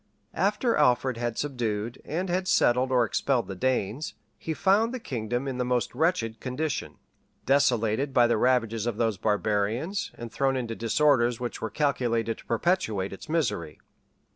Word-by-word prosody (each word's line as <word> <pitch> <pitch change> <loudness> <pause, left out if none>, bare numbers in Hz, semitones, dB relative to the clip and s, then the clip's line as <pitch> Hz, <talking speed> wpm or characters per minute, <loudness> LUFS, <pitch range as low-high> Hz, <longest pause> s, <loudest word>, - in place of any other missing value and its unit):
After 210 +5 +1
Alfred 130 -3 +2
had 120 -1 -3
subdued, 120 -4 -3
and 175 +5 -3
had 185 +1 -1
settled 125 -5 +3
or 125 -2 +4
expelled 125 +2 0
the 95 - -5
Danes, 125 +2 -1 0.2
he 160 - -4
found 215 +8 +2
the - - -4
kingdom 120 - -3
in 130 -2 -3
the - - +2
most 125 -1 0
wretched 120 -7 0
condition; 135 +3 -3 0.5
desolated 130 -1 +2
by 120 -2 +5
the 120 -1 +2
ravages 115 -3 +1
of 115 -3 -2
those 115 -4 0
barbarians, 110 - 0
and 120 -1 -8
thrown 135 +1 +1
into 120 -3 -3
disorders 120 0 +2
which 120 -2 -5
were 110 - -2
calculated 115 -5 0
to - - -15
perpetuate 115 - 0
its 95 - -11
misery. 115 - -1
125 Hz, 160 wpm, -27 LUFS, 115-145 Hz, 0.5 s, by